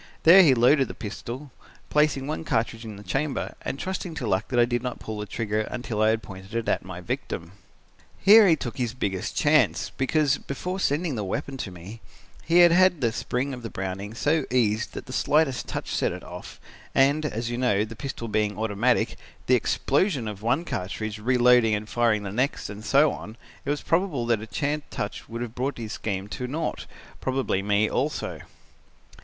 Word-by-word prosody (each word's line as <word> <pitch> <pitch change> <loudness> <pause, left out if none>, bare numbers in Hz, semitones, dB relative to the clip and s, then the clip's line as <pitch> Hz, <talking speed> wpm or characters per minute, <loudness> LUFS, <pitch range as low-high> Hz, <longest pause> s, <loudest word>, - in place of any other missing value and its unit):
There 180 +4 +9
he 145 -8 +6
loaded 130 +3 +4
the - - -8
pistol, 120 +5 -7 0.4
placing 150 -3 +2
one 155 +3 -3
cartridge 115 -4 -1
in 110 -2 -7
the 100 - -11
chamber, 140 +5 -2
and - - -4
trusting 185 0 -4
to 130 - -4
luck 95 -1 0
that 120 - 0
I 120 - +6
did 120 -1 -1
not 125 -1 -4
pull 110 -1 -6
the 105 - -5
trigger 110 -1 -1
until 120 -3 -3
I 110 - +5
had 110 - +4
it 115 - -9
pointed 100 +4 -6
at - - +1
my 90 -1 -8
victim. 85 -1 -4 0.7
Here 210 +2 +8
he 165 - +6
took 120 -7 -6
his 120 -1 -1
biggest 95 -7 -3
chance, 150 +1 +3
because, 140 +1 +1
before 180 +7 -4
sending 155 -1 0
the 110 -4 -2
weapon 135 +8 -3
to 110 - -4
me, 95 +6 -10 0.4
he 170 +2 +5
had 175 -1 +8
had 185 -1 +5
the 120 -4 +1
spring 125 +4 -2
of 125 - -7
the 115 - -6
Browning 95 +3 -5
so 150 +4 +1
eased 110 -3 +1
that - - -7
the 130 - -8
slightest 145 -2 +1
touch - - -4
set - - +1
it - - -7
off - - -10 0.4
and, 140 +3 +4
as 115 -5 -3
you 120 - -3
know, 105 -5 +2
the 115 +1 -9
pistol 120 -2 -5
being 105 -1 0
automatic, 110 +3 +1 0.3
the 130 - +3
explosion 135 - +1
of 105 -2 -6
one 125 +10 +1
cartridge, 110 - -4
reloading 125 -1 +4
and 105 0 -4
firing 115 -2 +1
the 100 - -5
next 125 -1 -1
and 105 +1 -9
so 140 +7 +4
on, 110 +3 -8 0.3
it - - -3
was 145 0 -1
probably 145 -10 +1
that 105 - -9
a 110 - -7
chance 150 +1 -1
touch 105 - -5
would 115 +1 -4
have 115 -2 -7
brought 130 +3 -2
his 115 -2 -5
scheme 100 -2 -3
to 125 +4 -5
nought 155 +6 -3 0.3
probably 130 -7 0
me 105 +2 +2
also. 145 +7 -2
120 Hz, 200 wpm, -25 LUFS, 110-140 Hz, 0.7 s, There